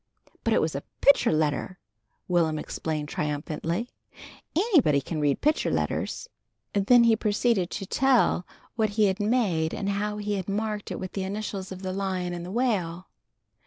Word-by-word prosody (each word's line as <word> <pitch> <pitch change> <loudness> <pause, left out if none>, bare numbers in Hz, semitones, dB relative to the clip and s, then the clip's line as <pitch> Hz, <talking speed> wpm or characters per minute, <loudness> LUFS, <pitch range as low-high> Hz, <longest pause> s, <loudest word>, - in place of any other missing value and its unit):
"But - - +2
it - - +3
was - - 0
a - - -3 0.2
picture 280 - +5
letter!" 155 +3 0 0.5
Will'm 165 -3 +2
explained 150 -1 -3
triumphantly. 155 +8 -3 0.6
"Anybody 320 - +4
can 155 +3 -4
read 145 -1 +1
picture 300 +1 +2
letters." - - -2 0.5
Then 235 +5 +5
he 230 -1 +5
proceeded 210 -3 +1
to 195 - -5
tell 250 -5 +2 0.3
what 220 -2 +1
he 215 - +5
had 195 +1 +1
made 205 -8 +1
and 200 - -2
how 210 +1 -1
he 205 -1 -2
had 190 0 -4
marked 210 0 -2
it - - -4
with 185 -1 -5
the 195 - -3
initials 195 -1 -4
of 190 0 -8
the 185 0 -3
Lion 185 -2 -2
and 175 -1 -5
the 175 - -7
Whale. 190 -6 -1
195 Hz, 165 wpm, -26 LUFS, 170-215 Hz, 0.6 s, picture